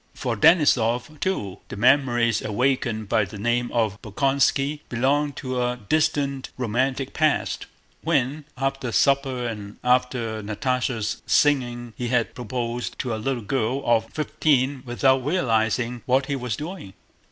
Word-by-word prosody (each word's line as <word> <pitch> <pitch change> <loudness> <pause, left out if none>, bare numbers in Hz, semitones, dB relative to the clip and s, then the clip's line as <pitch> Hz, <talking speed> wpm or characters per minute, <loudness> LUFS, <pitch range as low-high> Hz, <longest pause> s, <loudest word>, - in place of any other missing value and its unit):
For 120 -3 -2
Denísov, 145 - +3
too, 105 - -2
the - - -7
memories 120 -2 +3
awakened 120 -1 0
by 110 0 +2
the 105 +2 -7
name 120 +3 0
of 110 -4 0
Bolkónski 135 +5 +1
belonged 140 +4 +1
to 130 -2 -3
a 125 0 -1
distant, 140 +1 0
romantic 130 +3 -1
past, 155 -2 0 0.3
when 140 +5 0
after 135 -2 -2
supper 135 0 +2
and 105 -3 -6
after 125 -3 +1
Natásha's 115 +1 -2
singing 120 -5 +2
he 120 - -3
had 120 -1 0
proposed 120 0 -4
to 120 - -2
a - - -2
little 125 -1 -2
girl 130 +4 -1
of 115 -1 +3
fifteen 140 -1 0
without 130 +2 +2
realizing 120 - 0
what 130 +2 +3
he 140 0 -2
was 125 -4 -3
doing. 155 - -7
125 Hz, 135 wpm, -24 LUFS, 115-135 Hz, 0.3 s, Denísov